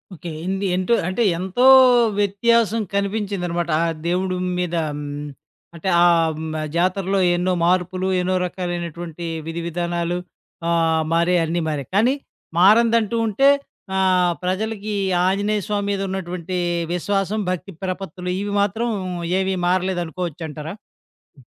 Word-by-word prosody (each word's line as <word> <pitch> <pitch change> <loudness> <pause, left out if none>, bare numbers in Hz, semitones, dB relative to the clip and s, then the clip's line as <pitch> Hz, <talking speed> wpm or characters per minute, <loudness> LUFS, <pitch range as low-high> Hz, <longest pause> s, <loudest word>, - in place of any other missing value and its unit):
Okay. 170 +1 -8
ఏంది 190 +2 -2
ఏంటో 185 +5 +1
అంటే, 190 +6 0 0.2
ఎంతో 190 +7 0 0.5
వ్యత్యాసం 225 +2 +2
కనిపించిందనమాట 200 -4 -1
ఆ - - +2 0.2
దేవుడు 185 +1 0 0.2
మీదా 175 -2 -1
హ్మ్, 145 0 -5 0.7
అంటే, 170 +3 -3
ఆహ్, 165 -2 +4
హ్మ్, 160 0 -5 0.2
జాతరలో 185 +2 +1 0.2
ఎన్నో 180 +1 0
మార్పులు, 185 +1 +1
ఎన్నో 185 +1 0
రకాలైనటువంటి 175 -2 -5 0.2
విధివిధానాలు, 170 +1 -2 0.5
ఆహ్, 165 -1 +2
మారాయన్ని 170 0 +2
మారాయి, 145 -4 -4
కానీ 240 +6 +4 0.4
మారనదంటూ 230 +3 +4
ఉంటే, 245 +7 +4 0.5
ఆహ్, 185 -2 +3
ప్రజలకీ 210 +3 -2 0.3
ఆంజనేయ 205 +2 +1
స్వామి 205 -1 -1
మీదున్నటువంటీ 185 -2 -3 0.3
విశ్వాసం, 195 +3 -1
భక్తి 185 +2 -5
ప్రపత్తులు. 185 -1 -4
ఇవి 205 0 -3
మాత్రం 220 +4 0 0.5
ఏవీ 190 0 0
మారలేదనుకోవచ్చంటారా? 175 -4 -2 0.6
హ్మ్. 130 - -19
185 Hz, 110 wpm, -21 LUFS, 170-200 Hz, 0.7 s, ఆహ్